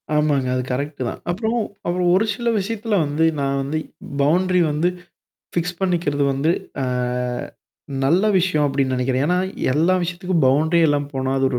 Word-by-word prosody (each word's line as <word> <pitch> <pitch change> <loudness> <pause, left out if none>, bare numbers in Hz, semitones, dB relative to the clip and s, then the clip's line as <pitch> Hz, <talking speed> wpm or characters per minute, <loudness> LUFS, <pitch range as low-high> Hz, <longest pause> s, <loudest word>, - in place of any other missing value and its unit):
ஆமாங்க. 145 -4 +2
அது 125 - -1
கரெக்ட்டு 140 +1 -3
தான். - - -7
அப்புறம், 220 +5 -1 0.3
அப்புறம் 175 0 +1
ஒரு 210 - +3
சில 235 +1 -4
விஷயத்துல 215 +2 -2
வந்து 150 +3 +1 0.2
நான் 140 0 0
வந்து 140 +3 -2 0.4
பவுண்ட்ரி 180 +5 +3
வந்து 155 +4 +1 0.6
ஃபிக்ஸ்! 175 +1 -2
பண்ணிக்கிறது 170 -6 +1
வந்து, 140 +4 +1 0.3
அ. - - 0 1.2
நல்ல 170 +8 +3 0.2
விஷயம் 170 -5 +1
அப்டின்னு 135 -2 0
நெனைக்கிறன். 130 +1 0
என்னா, 180 +2 +2 0.3
எல்லா 165 +6 +3
விஷயத்துக்கும் 175 -1 -1
பவுண்ட்ரி 155 +6 +3
இல்லாம 145 -1 +1
போனா 130 0 -1
அது 135 - +2
ஒரு 125 - -1
155 Hz, 155 wpm, -21 LUFS, 140-180 Hz, 1.2 s, ஒரு